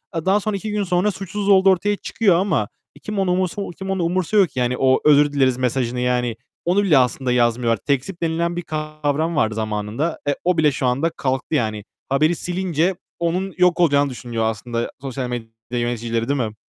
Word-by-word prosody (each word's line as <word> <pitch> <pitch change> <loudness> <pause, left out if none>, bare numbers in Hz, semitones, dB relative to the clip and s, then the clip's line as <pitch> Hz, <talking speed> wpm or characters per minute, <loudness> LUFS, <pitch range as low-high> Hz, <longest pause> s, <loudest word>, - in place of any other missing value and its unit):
Eee, 165 - -3
daha 195 +2 +4
sonra 210 0 -2
2 215 +2 -5
gün 210 -1 0
sonra 180 +2 +1
suçsuz 195 +1 -4
olduğu 195 0 +6
ortaya 205 +3 +2
çıkıyor 200 -2 +1
ama 175 - +1 0.4
kim 210 -1 -3
ona 190 -2 +1
umursa 185 +2 -1 0.2
kim 190 0 -4
onu 190 -2 -1
umursuyor 185 +3 +2
ki 130 - -6
yani 125 0 0
o 130 -1 +3
özür 145 -1 +5
dileriz 130 -3 +2
mesajını, 125 -1 -1
yani. 125 -2 0 0.3
Onu 185 +4 +2
bile 160 -8 +4
aslında 125 0 +1
yazmıyorlar. 120 -1 +2
Tekzip 140 +6 -2
denilen 170 +1 0
bir 175 - -2
kavram 155 0 -2
vardı 110 -6 +1
zamanında. 110 +8 -2
Eee, 145 - +2
o 180 0 +1
bile 155 -2 +4
şu 130 -1 -3
anda 135 +7 +1
kalktı 135 -1 -2
yani. 110 -5 -1 0.3
Haberi 155 +5 +2
silince 180 0 -1 0.2
onun 180 +3 -1
yok 180 -1 +3
olacağını 145 -4 +3
düşünüyor 120 -3 -4
aslında 115 +2 -3
sosyal 130 -2 -4
medya 120 -2 -5 0.3
yöneticileri 115 0 -2
değil 140 -1 +1
mi? 110 -3 -2
150 Hz, 190 wpm, -21 LUFS, 125-180 Hz, 0.4 s, olduğu